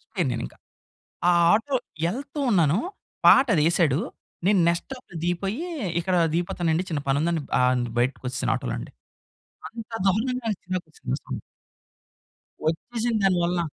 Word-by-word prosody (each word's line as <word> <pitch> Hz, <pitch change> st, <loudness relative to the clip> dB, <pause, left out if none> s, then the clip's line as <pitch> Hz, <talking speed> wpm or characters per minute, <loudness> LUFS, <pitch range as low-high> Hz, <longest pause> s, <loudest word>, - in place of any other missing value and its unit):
పోయాను -, -, +1 dB
నేనింకా. -, -, -5 dB, 0.7 s
ఆ -, -, +7 dB, 0.2 s
ఆటో 265 Hz, +5 st, +2 dB, 0.3 s
యెళ్తూ 275 Hz, -, -4 dB
ఉన్నాను, 170 Hz, -4 st, +3 dB, 0.5 s
పాటదేశాడు. 170 Hz, -, +5 dB, 0.5 s
నేను 200 Hz, -2 st, +4 dB
నెక్స్ట్ 170 Hz, 0 st, 0 dB
స్టాప్‌లో 255 Hz, -9 st, -9 dB
దిగిపోయీ, 195 Hz, -, -1 dB, 0.4 s
ఇక్కడా 180 Hz, +1 st, +1 dB, 0.2 s
దిగిపోతానండి, 170 Hz, 0 st, 0 dB
చిన్న 150 Hz, -3 st, -1 dB
పనుందని 155 Hz, +4 st, +1 dB, 0.2 s
ఆహ్, 125 Hz, 0 st, +4 dB
న్ 120 Hz, -, -2 dB
బయటకొచ్చేశాను 125 Hz, 0 st, 0 dB
ఆటోలోండి. -, -, -5 dB, 0.8 s
అంత 230 Hz, -1 st, -9 dB, 0.2 s
దారుణంగా 240 Hz, +6 st, 0 dB
నచ్చిందొక 180 Hz, -4 st, -5 dB
సినిమా -, -, -2 dB
సాంగ్. -, -, -5 dB, 1.3 s
ఒచ్చేసింది 230 Hz, +6 st, -2 dB
దాని 185 Hz, -2 st, +4 dB
వల్ల. 175 Hz, 0 st, +1 dB
175 Hz, 120 wpm, -25 LUFS, 160-225 Hz, 1.3 s, ఆ